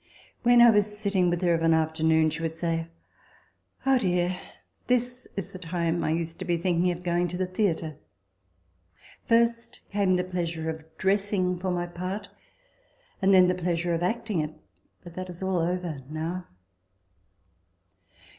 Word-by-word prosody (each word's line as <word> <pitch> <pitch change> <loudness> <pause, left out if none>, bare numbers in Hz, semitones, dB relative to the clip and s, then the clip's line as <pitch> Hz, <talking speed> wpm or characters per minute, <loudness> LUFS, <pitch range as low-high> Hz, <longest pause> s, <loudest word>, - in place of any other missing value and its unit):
When 240 0 +6
I 240 - +9
was 210 0 +1
sitting 200 -4 +1
with 175 +1 -1
her 175 -1 +4
of 165 - 0
an 165 0 +4
afternoon, 160 0 +2
she 160 +2 -4
would 160 -1 -2
say, 165 -1 -1 0.5
" - - -34
Oh, 270 -1 +4
dear! 180 -3 +1 0.5
this 250 0 0
is 195 - -4
the 185 - -9
time 170 -1 -1
I - - 0
used 165 +1 -2
to 185 - -4
be 175 -1 +1
thinking 175 0 +1
of 175 0 -4
going 175 0 +1
to 180 +1 -4
the 185 - 0
theatre: 175 -5 -1 1.3
first 230 0 +1
came 200 -2 +2
the 180 - +1
pleasure 170 -3 -2
of 160 0 -12
dressing 195 -1 +1
for 185 +1 -3
my 175 -1 -1
part; 185 +4 -5 0.9
and 195 +1 +4
then 185 -1 +7
the 180 - +2
pleasure 175 -1 -1
of 165 - -1
acting 215 0 -1
it: 155 0 -3 0.5
but 175 -2 -11
that 185 +1 -6
is 180 +1 -8
all 190 -2 +1
over 175 -2 -1
now." 165 +4 -4
180 Hz, 165 wpm, -27 LUFS, 165-190 Hz, 1.3 s, I